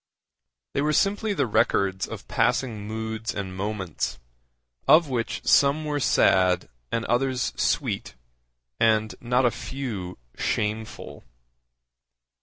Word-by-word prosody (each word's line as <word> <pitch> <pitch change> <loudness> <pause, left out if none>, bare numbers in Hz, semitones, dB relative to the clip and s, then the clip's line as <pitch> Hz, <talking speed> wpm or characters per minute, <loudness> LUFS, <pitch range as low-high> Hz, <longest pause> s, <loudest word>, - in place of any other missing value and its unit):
They 140 - 0
were 150 +1 +1
simply 205 +5 +1
the - - +2
records 100 -3 +1
of 110 -4 -8
passing 115 -3 0
moods 110 +1 -4
and 95 -2 -4
moments, 95 -4 -3 0.7
of 155 +2 +6
which 120 -3 -2
some 145 +2 +4
were 145 -1 -1
sad 90 -8 +3 0.2
and 115 0 -1
others 125 +1 0
sweet, - - -1 0.6
and 110 -1 +3
not 125 +2 +2
a 120 - +4
few 110 -10 -5 0.2
shameful. 110 +1 -3
115 Hz, 110 wpm, -25 LUFS, 105-135 Hz, 0.7 s, of